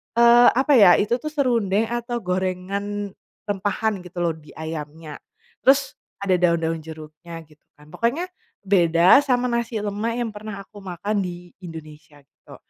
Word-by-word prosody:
eee, 235 +1 +7
apa 270 +4 +2
ya 200 -6 +8
itu 235 +4 +1
tuh 305 - -6
serundeng 230 -8 +1
atau 240 0 -3
gorengan, 190 +3 -3 0.4
rempahan 205 +1 -1
gitu 180 0 -8
loh 170 - +1
di 150 -1 -16
ayamnya, 155 -1 -7 0.4
terus 270 +1 +3 0.2
ada 195 -2 +2
daun-daun 165 -2 +1
jeruknya 160 +1 -10
gitu 150 -1 -23 0.2
kan 150 +1 -19
pokoknya, 280 - -1 0.3
beda 175 - +5
sama 250 -2 +1
nasi 235 -2 -2
lemak 210 +3 -2
yang 235 -2 -2
pernah 210 -1 -8
aku 205 +1 -15
makan 200 +3 -3
di 175 0 -8
Indonesia 155 -3 -11
gitu - - -17
195 Hz, 145 wpm, -22 LUFS, 165-230 Hz, 0.4 s, ya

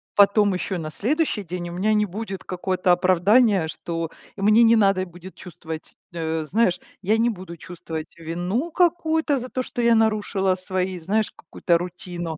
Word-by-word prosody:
потом 205 0 +5
ещё 185 +1 -2
на 160 -2 -5
следующий 235 - -1
день 175 0 -5
у - - -7
меня 200 +5 +1
не 210 0 +3
будет 195 0 -6
какое-то 185 0 0
оправдание, 185 +2 +4
что 165 +1 -4 0.3
и 195 - -8
мне 215 +3 +5
не 230 0 +6
надо 195 -3 +3
будет 175 +1 -12
чувствовать 160 -3 -9 0.2
Э, 160 -1 -2
знаешь, 185 +1 +1 0.2
я 210 +3 +2
не 230 +1 +3
буду 185 -5 -7
чувствовать 160 -2 -8
вину 175 - -3
какую-то 320 -3 +2
за 250 0 -5
то, 255 - -2
что 245 - -4
я 235 0 +4
нарушила 210 -4 +1
свои, 185 0 -3
знаешь, 210 +6 0
какую-то 170 -2 0
рутину. 175 -2 -6
190 Hz, 170 wpm, -23 LUFS, 175-220 Hz, 0.3 s, не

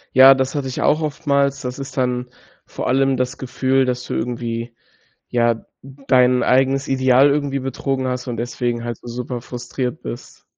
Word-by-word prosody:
Ja, 130 +1 +10
das 130 +2 -1
hatte 140 -2 -2
ich 130 - -4
auch 155 - +3
oftmals. 140 -2 0
Das 125 +1 -5
ist 135 0 -7
dann 125 -1 -1 0.4
vor - - -5
allem 135 +1 +3
das 125 0 -2
Gefühl, 130 +1 +1
dass 125 -1 -2
du - - -6
irgendwie, 115 0 -3 0.5
ja, 120 -1 +1 0.2
dein 130 -2 +2
eigenes 135 +2 +2
Ideal 130 +1 +4
irgendwie 140 -1 0
betrogen 135 0 -2
hast 125 0 -3
und 120 -2 -3
deswegen 120 0 -2
halt 120 -1 -4
so - - -21
super 125 +1 -4
frustriert 125 +1 -5
bist. - - -9
130 Hz, 170 wpm, -20 LUFS, 125-135 Hz, 0.5 s, Ja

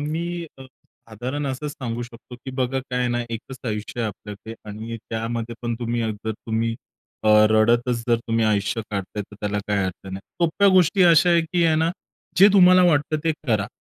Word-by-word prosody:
मी 170 +3 -3
अ, - - -9 0.5
साधारण 130 +7 -4
असंच 135 +3 -3
सांगू 120 -3 -4
शकतो 120 +1 -11
की 130 - -5
बघा 130 0 0
काय 125 - -1
आहे 125 -1 +1
ना, 120 0 0
एकच 125 +3 -7
आयुष्य 105 +2 -4
आहे 115 - 0
आपल्याकडे 105 +2 -9
आणि 110 +2 -6
त्यामध्ये 115 +1 -3
पण 120 -1 -1
तुम्ही 120 -1 -2
अ, 110 - -1
जर 110 - -1
तुम्ही 115 +1 -2 0.8
रडतच 115 +2 +2
जर, 120 - +4
तुम्ही 115 -1 -1
आयुष्य 105 +1 +1
काढताय 100 +1 -4
तर 105 - -15
त्याला 105 0 -1
काही 105 - +1
अर्थ 95 +1 -6
नाही. 95 0 -6 0.2
सोप्या 195 +5 +3
गोष्टी 185 +1 +4
अशा 175 0 +6
आहेत 170 -1 +4
की 175 -1 +3
आहे 160 -1 +4
ना, 160 +1 +2 0.5
जे 195 +3 +9
तुम्हाला 185 -2 +7
वाटतं 155 -2 +2
ते 160 - +2
करा. 105 -4 +1
120 Hz, 190 wpm, -23 LUFS, 110-150 Hz, 0.8 s, जे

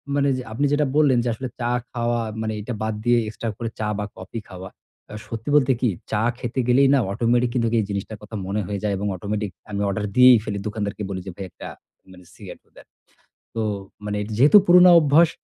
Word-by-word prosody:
মানে 140 0 +2
যে 125 - -5
আপনি 125 +7 0
যেটা 145 0 +2
বললেন 140 -5 +4
যে, - - -3
আসলে 130 +3 -5
চা 120 +1 0 0.2
খাওয়া 120 0 -1 0.2
মানে 110 0 -2
এটা 120 +3 -5
বাদ 110 0 -1
দিয়ে 120 0 +4
এক্সট্রা 110 +1 -5
করে 115 -1 -4
চা 105 - -1
বা, 105 - -3
কফি 115 - -7
খাওয়া। 95 0 -9 0.4
আ - - -9
সত্যি 115 +5 -6
বলতে 135 -2 +4
কী? 125 - +2 0.2
চা 105 0 +1 0.2
খেতে 125 +1 -4
গেলেই 135 +3 +5
না - - +3
অটোমেটিক 120 +3 +1
কিন্তুক 115 -2 0
এই 105 - 0
জিনিসটার 100 +2 -4
কথা 105 +1 -10
মনে 105 +2 -1
হয়ে 100 -1 -3
যায় 105 -1 0
এবং 100 +1 -3
অটোমেটিক 105 +2 -4 0.2
আমি 100 0 -2
অর্ডার 105 +1 -2
দিয়েই 125 -1 +8
ফেলি। 100 -2 -4
দোকানদারকে 105 -1 -4
বলি 95 -1 -4
যে 95 - -4
ভাই 95 - -6
একটা - - -10 0.4
মানে 90 -1 -15
সিগারেটও - - -12
দেন। - - -15 0.7
তো 115 - -1 0.4
মানে 105 0 -2 0.2
যেহেতু 145 - +7
পুরোনো 180 0 +7
অভ্যাস, 155 +2 +4
115 Hz, 210 wpm, -22 LUFS, 105-125 Hz, 0.7 s, দিয়েই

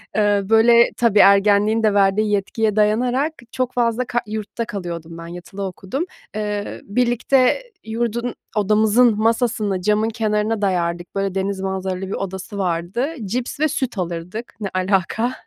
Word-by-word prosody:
Eee, 205 -1 +3
böyle, 235 +1 +6
tabii 225 -4 +3
ergenliğin 205 +2 +5
de 210 -2 +3
verdiği 205 +1 +3
yetkiye 210 +1 0
dayanarak 245 +8 +2 0.2
çok 255 -1 -2
fazla 240 0 +1
ka 240 0 -1
Yurtta 215 +2 -4
kalıyordum 170 -5 -6
ben, 165 0 -8
yatılı 175 +3 -8
okudum. 190 - -4 0.3
Eee, 210 -1 -3
birlikte 250 - +2 0.2
yurdun 235 +1 -2 0.2
odamızın 215 +2 +3
masasını 220 -4 +1
camın 210 +3 +2
kenarına 215 -1 -1
dayardık, 175 -2 -1
böyle, 195 -1 -1
deniz 195 0 -1
manzaralı 190 -1 -3
bir - - -4
odası 195 +2 -5
vardı. 185 - -1 0.2
Cips 245 +7 -3
ve 310 - +3
süt 260 -6 -3
alırdık. 180 +6 -5
Ne 200 -2 -3
alaka? 195 +6 0
210 Hz, 140 wpm, -20 LUFS, 195-235 Hz, 0.3 s, böyle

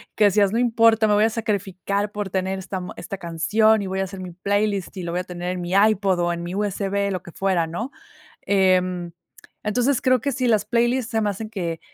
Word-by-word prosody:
que 215 - +2
decías: 200 -1 +4
"No 225 - 0
importa, 230 -2 +4
me 210 - +3
voy 210 +1 +4
a - - +3
sacrificar 200 -2 -2
por 205 -3 -4
tener 190 0 -1
esta 190 0 -5
mu 180 - -7
esta 195 +2 -6
canción 205 +6 +2
y 195 - -4
voy 190 +1 -3
a 195 - 0
hacer 190 0 -8
mi 180 -1 -7
playlist 200 +1 -1
y 185 - -4
lo 170 - -4
voy 175 - -1
a - - -7
tener 180 0 -5
en 180 -1 -4
mi 175 +1 -4
iPod 200 -2 +3
o 175 0 +1
en 170 - -5
mi 175 +2 -5
USB", 200 0 -1
lo 185 -2 -3
que 175 - -12
fuera, 185 -3 0
¿no? 220 - -5 0.5
Em, 185 -3 +1 0.5
entonces 245 +5 +1
creo 255 -1 +3
que 280 - -1
sí 255 0 -1
las 215 -3 +2
playlists 240 +2 +1
se 225 - +1
me 210 - +1
hacen 215 +2 -5
que, 170 -6 -3
200 Hz, 235 wpm, -23 LUFS, 180-215 Hz, 0.5 s, decías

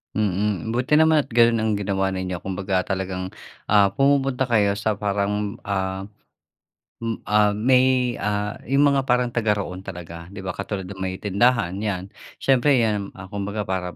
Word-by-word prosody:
Mm, 105 +1 -1
buti 130 +5 +3
naman 160 -2 +5
at - - -20
ganun 115 -1 +4
ang 110 - +1
ginawa 95 -1 0
ninyo, 95 -2 -4
kumbaga 95 0 -1
talagang, 95 -1 -3 0.4
ah, 100 -2 +6
pumupunta 135 -1 +2
kayo 105 -5 +2
sa 100 0 -1
parang, 105 0 -1
ah, 95 -1 -2 1.0
mm 115 -1 -4
ah, 105 0 +3
may, 125 +2 +3
ah, 105 0 -2
yung 140 +3 +3
mga 135 -1 0
parang 125 -1 +2
taga-roon 105 -5 -1
talaga, 85 -3 -9
di 95 +1 -9
ba, 95 - -2
katulad 100 +1 -4
ng 95 +1 -9
may 95 0 -2
tindahan 105 0 +2
yan. 100 -2 -3 0.2
Siyempre, 135 +1 +3
iyan, 105 -3 -2
ah, 95 0 -11
kumbaga, 100 +1 -3
para 90 -2 -3
105 Hz, 160 wpm, -23 LUFS, 95-115 Hz, 1.0 s, ah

